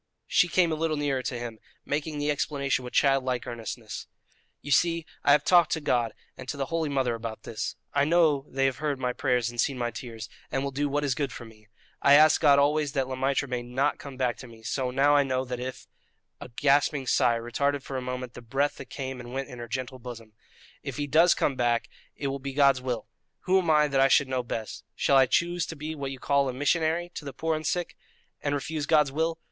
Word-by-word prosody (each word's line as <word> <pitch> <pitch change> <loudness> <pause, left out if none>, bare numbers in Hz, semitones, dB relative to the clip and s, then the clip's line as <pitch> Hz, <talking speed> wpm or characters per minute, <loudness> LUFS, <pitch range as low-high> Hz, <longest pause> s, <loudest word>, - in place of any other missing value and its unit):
She 180 - +3
came 175 -1 +2
a - - +1
little 155 -1 -1
nearer 140 -3 0
to 125 -1 -3
him, 120 -2 -6 0.3
making 150 +1 -2
the 145 0 0
explanation 140 -2 -1
with 125 - -7
child 135 -1 +3
like 125 -2 -2
earnestness: 115 -2 -6 0.6
"You 145 - -6
see, 165 +4 +3 0.2
I - - +5
have 145 - +5
talked 175 -3 +5
to 160 - -1
God 120 -6 0 0.2
and 130 -1 -10
to 140 - -3
the 135 - -1
holy 165 -2 0
Mother 130 -4 0
about 115 -1 -6
this. 110 - -4 0.2
I 140 - +3
know 155 -3 +3
they 135 0 0
have 135 -1 0
heard 150 -2 -1
my 125 -1 -1
prayers 125 -3 0
and 120 -1 0
seen 135 +1 -1
my 120 -1 -1
tears, 115 -3 -7 0.2
and 135 - -1
will 140 - -2
do 145 +2 -1
what 145 +1 0
is 140 -2 +1
good 140 0 -2
for 120 - -8
me. 110 -1 -17 0.3
I 140 - +7
ask 155 +1 +6
God 145 -3 +6
always 145 0 +2
that 135 -3 0
Le 130 - -4
Maître 135 +2 0
may 125 -1 -2
not 125 +4 -1
come 140 -2 -9
back 125 -2 0
to 125 - -10
me, 115 -1 -15
so 130 +3 -1
now 140 +3 +3
I 145 - +6
know 130 -1 -1
that 125 -1 -5
if" 130 +1 -6 0.5
(a - - -9
gasping 140 +2 +2
sigh 120 -2 +3
retarded 140 +4 -1
for 135 - -7
a 130 - -2
moment 125 -1 -5
the - - -10
breath 135 +5 -1
that - - -9
came 130 -2 -5
and 120 0 -9
went 135 +1 -3
in 125 -2 -9
her 120 - -6
gentle 130 +1 -4
bosom) 115 -3 -9 0.5
"if - - -6
he 145 - -1
does 165 +5 +5
come 140 - 0
back 120 -2 +1 0.3
it 145 - -6
will 135 0 -3
be 135 0 -5
God's 140 -2 +4
will. 125 -4 -3 0.3
Who 190 +1 +3
am 175 -3 -2
I 150 -1 +5
that 135 -1 +2
I 135 - +6
should 140 0 +4
know 130 -1 0
best? 115 -2 -5
Shall 140 - +3
I 130 -1 +6
choose 175 +5 +1
to 165 - -6
be 155 +1 -5
what 140 -3 -4
you 135 - -6
call 140 +1 +1
a - - -3
'missionary' 160 +5 0
to - - -7
the 140 -2 -7
poor 160 0 -1
and 155 -1 -3
sick 175 +1 -2 0.5
and 145 0 0
refuse 145 +1 -3
God's 150 -4 +4
will? 160 +3 -1
135 Hz, 245 wpm, -27 LUFS, 125-145 Hz, 0.6 s, I